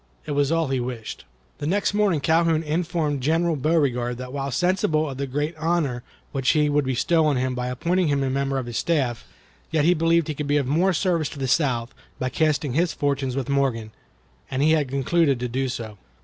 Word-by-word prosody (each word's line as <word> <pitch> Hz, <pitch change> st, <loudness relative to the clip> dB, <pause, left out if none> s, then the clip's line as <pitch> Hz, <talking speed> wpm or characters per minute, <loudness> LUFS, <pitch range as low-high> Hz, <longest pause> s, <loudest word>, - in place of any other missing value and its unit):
It -, -, -5 dB
was 145 Hz, 0 st, +1 dB
all 165 Hz, -3 st, +1 dB
he 135 Hz, -1 st, 0 dB
wished. 120 Hz, -3 st, -6 dB, 0.3 s
The 145 Hz, -, -3 dB
next 200 Hz, +4 st, +1 dB
morning 200 Hz, -7 st, +2 dB
Calhoun 165 Hz, 0 st, +2 dB
informed 160 Hz, -2 st, -1 dB
General 165 Hz, +4 st, +1 dB
Beauregard 130 Hz, -5 st, 0 dB
that 125 Hz, +1 st, -7 dB
while 140 Hz, -1 st, -3 dB
sensible 155 Hz, +1 st, +1 dB
of 135 Hz, -2 st, -6 dB
the 140 Hz, -, -2 dB
great 145 Hz, +5 st, -2 dB
honor 155 Hz, -6 st, 0 dB, 0.3 s
which 135 Hz, -2 st, 0 dB
he 150 Hz, -1 st, +2 dB
would 145 Hz, -1 st, +1 dB
bestow 155 Hz, +5 st, +2 dB
on 145 Hz, -3 st, +2 dB
him 130 Hz, 0 st, 0 dB
by 125 Hz, 0 st, -3 dB
appointing 170 Hz, +8 st, 0 dB
him 140 Hz, -1 st, +1 dB
a 135 Hz, -, 0 dB
member 135 Hz, 0 st, -1 dB
of 130 Hz, -, -2 dB
his 120 Hz, -1 st, -3 dB
staff, 135 Hz, -8 st, 0 dB, 0.5 s
yet 155 Hz, -2 st, +1 dB
he 175 Hz, -, +5 dB
believed 165 Hz, -1 st, +2 dB
he 155 Hz, -, -2 dB
could 150 Hz, 0 st, -4 dB
be 145 Hz, +1 st, +2 dB
of 140 Hz, -, +1 dB
more 165 Hz, +8 st, +2 dB
service 170 Hz, -3 st, 0 dB
to -, -, -10 dB
the 135 Hz, -1 st, -2 dB
South 125 Hz, -4 st, +1 dB, 0.2 s
by 130 Hz, -, -2 dB
casting 150 Hz, -2 st, 0 dB
his 165 Hz, +4 st, +1 dB
fortune 140 Hz, -2 st, -1 dB
with 135 Hz, -1 st, -2 dB
Morgan, 130 Hz, -6 st, 0 dB, 0.6 s
and 135 Hz, +2 st, 0 dB
he 155 Hz, -, +4 dB
had 155 Hz, -3 st, +2 dB
concluded 140 Hz, +1 st, +1 dB
to 125 Hz, -, -2 dB
do 130 Hz, +2 st, -2 dB
so. 110 Hz, -5 st, -6 dB
145 Hz, 215 wpm, -24 LUFS, 130-160 Hz, 0.6 s, he